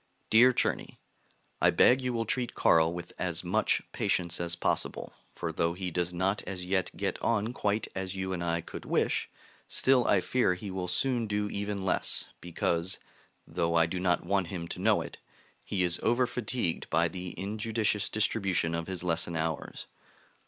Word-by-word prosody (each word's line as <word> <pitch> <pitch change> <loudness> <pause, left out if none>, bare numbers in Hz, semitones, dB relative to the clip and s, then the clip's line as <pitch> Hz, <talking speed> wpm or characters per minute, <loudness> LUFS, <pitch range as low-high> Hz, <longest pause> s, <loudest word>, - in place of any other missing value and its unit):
DEAR 120 +4 +7
CZERNY, - - -1 0.6
I - - +6
beg 130 +1 +5
you 125 -1 -1
will 115 -1 -1
treat 120 +2 -1
Carl 80 0 +4
with 85 0 -7
as - - -1
much - - +1
patience 85 -1 0
as 85 0 0
possible; - - -2 0.2
for 85 - -3
though 85 +1 0
he 90 -1 -4
does 90 +1 0
not 95 +3 0
as 95 -2 -5
yet 95 0 +1
get - - -2
on 115 +1 0
quite 105 -2 0
as 95 0 -4
you 95 0 -2
and 85 -1 -3
I 85 0 0
could - - -9
wish, - - 0 0.4
still 130 -2 +3
I 100 - +4
fear 110 -2 +1
he 95 +2 -7
will 95 -1 -3
soon 120 +1 0
do 105 0 -1
even 100 -1 -3
less, 95 - +1 0.2
because 85 +1 -1 0.5
(though 85 0 -1
I 85 0 +5
do 90 +2 -3
not 90 -1 +1
want 95 -1 +1
him 85 -2 -5
to - - -5
know - - +3
it) - - -8 0.4
he 95 -2 -1
is 85 -1 +1
over 120 +3 +3
fatigued 120 -7 -2
by 85 +1 +3
the 90 +1 -7
injudicious 105 +1 0
distribution 95 -6 +1
of 85 0 -3
his 95 -2 -4
lesson 85 -1 +1
hours. 80 -1 -3
95 Hz, 180 wpm, -29 LUFS, 85-105 Hz, 0.6 s, DEAR